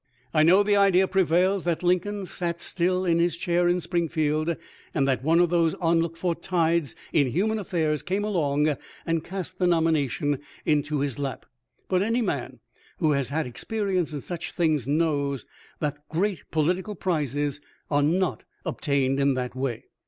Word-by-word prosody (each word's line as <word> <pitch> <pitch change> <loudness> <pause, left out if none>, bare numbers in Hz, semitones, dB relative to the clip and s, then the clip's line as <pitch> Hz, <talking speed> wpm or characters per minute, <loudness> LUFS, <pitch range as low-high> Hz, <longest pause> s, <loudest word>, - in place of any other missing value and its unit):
I 155 - +4
know 180 +6 +6
the 205 0 +2
idea 190 -2 +4
prevails 185 +1 +2
that 170 0 0
Lincoln 185 +3 +1
sat 170 -2 -3
still 185 +2 0
in 170 -1 +3
his 170 -1 +1
chair 175 0 +1
in 175 +1 +2
Springfield, 160 -2 0 0.4
and 140 -3 +2
that 130 -3 0
one 165 +3 +4
of 175 -1 +3
those 170 -2 +2
unlooked 165 -1 +1
for 175 0 0
tides 170 -5 0 0.2
in 145 -3 +4
human 210 - 0
affairs 160 -6 -1
came 195 +3 -1
along 150 -7 +1 0.3
and 165 -1 0
cast 185 0 -6
the 180 - +3
nomination 150 -4 +1 0.3
into 150 -1 +1
his 140 -2 -2
lap; 135 -2 -4 0.4
but 185 -1 +2
any 230 +4 +1
man 130 - -3 0.4
who 160 -3 +2
has 140 -3 0
had 155 +2 -1
experience 185 - -1
in 145 -2 -4
such 175 +3 -6
things 155 -7 +1
knows 140 -3 0 0.3
that 145 0 -4
great 185 +3 -1
political 180 +7 0
prizes 145 -5 -1 0.3
are 145 0 +3
not 175 +5 +1 0.2
obtained 140 -2 0
in 140 -1 +3
that 125 -1 -3
way. 130 -3 -2
165 Hz, 165 wpm, -26 LUFS, 145-180 Hz, 0.4 s, know